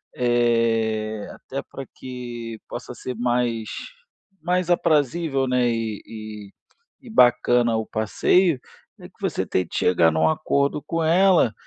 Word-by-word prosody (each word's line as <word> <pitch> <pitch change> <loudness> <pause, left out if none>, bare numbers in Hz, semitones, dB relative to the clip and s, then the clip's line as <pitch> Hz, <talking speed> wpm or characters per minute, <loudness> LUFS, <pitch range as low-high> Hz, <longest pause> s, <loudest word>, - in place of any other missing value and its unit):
é 115 -3 +1
até - - -7
pra 135 - -9
que 120 -3 -7
possa - - -7
ser 125 - -6
mais 120 -2 0 0.7
mais 180 +2 0
aprazível 155 -4 +1
né 125 -1 +2
e 115 -3 -2
e 110 -2 -9 0.5
e 255 - -13
bacana 120 - +4
o 110 - -2
passeio, 135 - +2 0.4
é - - -10
que - - -37
você - - -1
tente 90 -2 -1
que - - -3
chegar 85 -2 +4
num 80 0 +2
acordo 140 - 0
com 165 -1 -2
ela. 170 - +4
120 Hz, 135 wpm, -23 LUFS, 110-145 Hz, 0.7 s, bacana